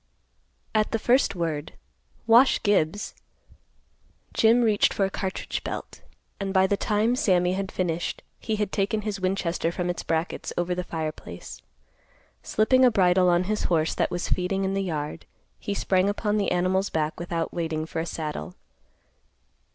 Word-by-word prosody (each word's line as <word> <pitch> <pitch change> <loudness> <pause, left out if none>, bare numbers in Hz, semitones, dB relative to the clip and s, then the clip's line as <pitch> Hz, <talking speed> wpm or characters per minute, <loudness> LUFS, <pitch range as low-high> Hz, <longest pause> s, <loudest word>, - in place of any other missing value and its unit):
At 215 +1 +1
the - - +3
first 245 0 +2
word, 160 -4 -3 0.5
"Wash 235 +4 +6
Gibbs," 205 -1 +1 1.2
Jim 230 +2 +4
reached 215 -3 +3
for 195 - +2
a 195 - -3
cartridge 190 0 -4
belt, - - -6 0.4
and, 195 -1 -2
by 190 -1 +4
the 200 - +2
time 215 +4 +1
Sammy 185 -9 +2
had 195 0 -3
finished, 175 -2 -2 0.2
he 220 - -2
had 210 -2 -2
taken 210 +2 0
his 205 -2 -3
Winchester 185 -3 -1
from 175 0 -1
its 175 - -5
brackets 165 +1 -2
over 175 +1 0
the 180 0 -2
fireplace. 160 -3 -6 0.8
Slipping 255 +5 +3
a 255 - +8
bridle 180 -4 +4
on 175 +1 +3
his 210 +3 -1
horse 165 -2 +1
that - - 0
was 175 - -3
feeding 190 +2 0
in 190 - -1
the 195 - 0
yard, 155 -4 -4 0.3
he 200 - -3
sprang 190 0 +2
upon 210 +1 0
the 205 - 0
animal's 185 +2 +1
back 155 0 -2
without 170 -1 -3
waiting 160 -2 -2
for 160 - -4
a 165 - -1
saddle. 160 +3 -5
185 Hz, 160 wpm, -26 LUFS, 170-205 Hz, 1.2 s, a